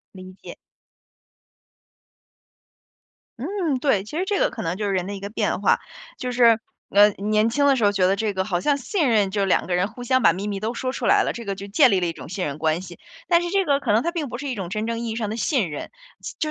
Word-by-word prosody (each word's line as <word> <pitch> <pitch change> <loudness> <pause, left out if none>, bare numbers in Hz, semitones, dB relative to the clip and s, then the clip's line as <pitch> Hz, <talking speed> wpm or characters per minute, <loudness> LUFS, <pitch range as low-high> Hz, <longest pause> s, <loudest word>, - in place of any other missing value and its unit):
理 185 0 -10
解。 - - -9 2.8
嗯， 335 - -1
对， 250 -8 +1
其 295 - -6
实 360 - 0
这 400 0 0
个 - - +3
可 250 -3 -7
能 170 0 -2
就 210 - -2
是 200 - 0
人 185 -1 -1
的 200 - -4
一 - - -7
个 200 +1 -6
变 215 - -1
化。 - - +3 0.4
就 250 - -4
是， 235 -2 +5 0.3
呃， 205 +1 +6
年 215 +2 +1
轻 285 +5 +1
的 280 -1 +5
时 240 - -1
候 205 - +4
觉 190 -2 +2
得 195 - +2
这 210 0 -1
个 190 0 -1
好 180 -4 -1
像 285 +7 +2
信 300 - 0
任 210 -4 +3
就 200 +1 -1
2 195 - +1
个 180 - 0
人 180 +3 +1
互 245 - -10
相 260 +1 +2
把 - - +7
秘 190 +4 -4
密 200 -2 -4
都 220 +2 -2
说 255 +1 -3
出 - - -4
来 - - +5
了， - - -2
这 235 - -7
个 200 -2 -3
就 195 +1 -8
建 200 - +4
立 195 - +3
了 180 - -1
一 165 - -3
种 - - -11
信 185 +1 -3
任 140 -1 -4
关 160 +2 0
系。 175 -2 -10 0.3
但 340 0 +4
是 350 - -3
这 390 +1 +1
个 285 -2 +1
可 - - 0
能 220 +3 +3
它 340 - -1
并 320 -6 -3
不 240 - -5
是 285 +3 -6
一 260 - -3
种 190 -5 -5
真 215 +3 -3
正 230 0 -2
意 235 - -3
义 220 - -4
上 220 -3 -2
的 215 - -3
信 230 - 0
任。 150 - -7 0.5
就 310 - -1
215 Hz, 290 characters per minute, -23 LUFS, 195-260 Hz, 2.8 s, 把